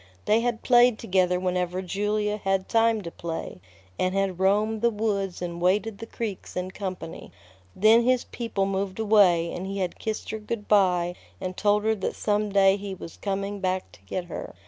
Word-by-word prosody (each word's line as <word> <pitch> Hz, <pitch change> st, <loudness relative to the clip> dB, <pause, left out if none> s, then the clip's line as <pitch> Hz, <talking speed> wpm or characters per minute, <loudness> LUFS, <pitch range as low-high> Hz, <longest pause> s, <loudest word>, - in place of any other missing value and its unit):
They 215 Hz, +2 st, +4 dB
had 240 Hz, -1 st, -2 dB
played 245 Hz, -2 st, +5 dB
together 185 Hz, -4 st, +1 dB
whenever 180 Hz, 0 st, -1 dB
Julia 210 Hz, +3 st, -1 dB
had 195 Hz, -2 st, -1 dB
time 225 Hz, -1 st, +3 dB
to 170 Hz, -, -6 dB
play, 165 Hz, -, -6 dB, 0.4 s
and 185 Hz, +1 st, +1 dB
had 195 Hz, -2 st, 0 dB
roamed 210 Hz, +3 st, +2 dB
the 235 Hz, -, +4 dB
woods 200 Hz, -5 st, -2 dB
and 170 Hz, -1 st, -5 dB
waded 200 Hz, +4 st, +1 dB
the 225 Hz, -, -7 dB
creeks 220 Hz, -5 st, -5 dB
in 180 Hz, +1 st, -3 dB
company. 185 Hz, -4 st, -6 dB, 0.4 s
Then 220 Hz, +4 st, +5 dB
his 255 Hz, 0 st, +2 dB
people 225 Hz, -5 st, -2 dB
moved 195 Hz, -1 st, -2 dB
away, 200 Hz, -6 st, +4 dB
and 185 Hz, +2 st, -5 dB
he 195 Hz, +1 st, -4 dB
had 185 Hz, -3 st, -3 dB
kissed 220 Hz, -1 st, -4 dB
her 220 Hz, -, -4 dB
good 210 Hz, 0 st, -5 dB
by 180 Hz, -4 st, +3 dB, 0.3 s
and 185 Hz, -1 st, -4 dB
told 210 Hz, +1 st, +2 dB
her 220 Hz, 0 st, +2 dB
that 200 Hz, -3 st, -3 dB
some 210 Hz, 0 st, 0 dB
day 195 Hz, 0 st, +5 dB
he 200 Hz, -1 st, -6 dB
was 165 Hz, -2 st, -9 dB
coming 200 Hz, 0 st, -3 dB
back 185 Hz, 0 st, -2 dB
to -, -, -18 dB
get 175 Hz, -, -4 dB
her. -, -, -7 dB
195 Hz, 190 wpm, -26 LUFS, 185-215 Hz, 0.4 s, played